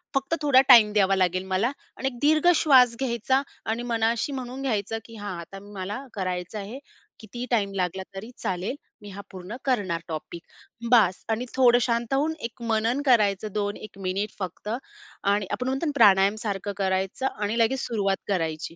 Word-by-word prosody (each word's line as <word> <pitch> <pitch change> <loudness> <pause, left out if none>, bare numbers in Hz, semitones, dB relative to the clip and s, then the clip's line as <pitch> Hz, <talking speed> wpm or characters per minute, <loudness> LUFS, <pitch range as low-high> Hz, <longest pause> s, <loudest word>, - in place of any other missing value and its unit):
फक्त 270 +4 +1
थोडा 280 -3 +6
टाईम 225 -4 +9
द्यावा 195 -2 +3
लागेल 185 -1 +1
मला." 220 +7 +2 0.3
आणि 270 - -2
1 255 -2 -4
दीर्घ 310 +3 +3
श्वास 255 -7 +5
घ्यायचा 260 +1 +1 0.2
आणि 225 +2 -2
मनाशी 230 +2 0
म्हणून 260 -1 -5
घ्यायचं, 225 -4 -1
की 230 - -12
"हां, 205 -4 -6
आता 185 +3 -9
मला 205 +7 -5
करायचं 185 +1 -3
आहे, 210 +7 -7 0.4
कितीही 240 +3 -7
टाईम 200 -4 +1
लागला 190 0 -2
तरी 205 +4 -7
चालेल, 185 +7 -3 0.3
मी 205 - -10
हा 200 +1 -8
पूर्ण 185 +3 -8
करणार 200 -10 0
टॉपिक. 165 +1 -6 0.5
बास! 210 -7 +4
आणि 225 +2 -1
थोडं 245 -2 +5
शांत 235 +1 0
होऊन 295 +4 +1
एक 235 - -23
मनन 225 +5 +1
करायचं 210 -5 +3
2-1 205 -1 -4
मिनिट 195 +3 -1
फक्त. 185 +2 -6 0.5
आणि 200 0 +2
आपण 250 - -2
म्हणतो 270 +5 -1
ना, 300 - 0
प्राणायामसारखं 200 -1 +3
करायचं 190 +5 -1
आणि 210 +2 -1
लगेच 235 +4 +2
सुरुवात 200 -4 0
करायची. 165 -4 -2
215 Hz, 165 wpm, -25 LUFS, 195-245 Hz, 0.5 s, टाईम